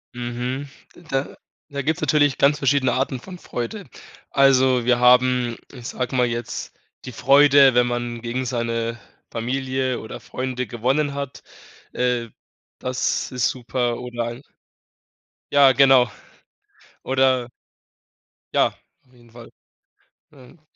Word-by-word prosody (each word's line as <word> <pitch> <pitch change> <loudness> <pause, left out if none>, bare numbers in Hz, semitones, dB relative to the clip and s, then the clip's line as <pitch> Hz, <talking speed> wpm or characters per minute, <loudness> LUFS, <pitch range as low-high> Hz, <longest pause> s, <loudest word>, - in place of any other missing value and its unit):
Mhm. 125 +3 -4 0.3
D - - -16
da 135 -4 -3 0.3
da 140 -1 -4
gibt's 155 +3 -1
natürlich 145 -2 +2
ganz 145 +2 +3
verschiedene 140 -2 +2
Arten 130 0 -1
von 185 +4 -10
Freude. 175 - -6 0.4
Also, 130 -2 +4
wir 120 0 +2
haben, 125 -1 +4
ich 125 -3 -9
sage 125 0 -4
mal 125 - +4
jetzt, 120 -1 -5 0.3
die 125 - -7
Freude, 140 +1 +6
wenn 125 0 +4
man 120 -1 -3
gegen 120 +2 -3
seine 115 -1 -2 0.3
Familie 130 +2 -2
oder 110 - -8
Freunde 130 -1 -4
gewonnen 135 +7 0
hat. 140 -1 -6 0.5
Äh, 125 -1 0 0.5
das 130 0 -2
ist 125 -2 +1
super 120 -1 -2
oder 120 -1 -4
ein 120 +2 -6 1.1
Ja, 140 -2 +6
genau. 130 -1 +5 0.9
Oder 130 -2 +1 1.0
Ja, - - +3 0.3
auf 130 - -29
jeden 120 -1 -21
Fall. 115 0 -13 0.8
Ähm 135 +3 -18
125 Hz, 125 wpm, -22 LUFS, 120-135 Hz, 1.1 s, Freude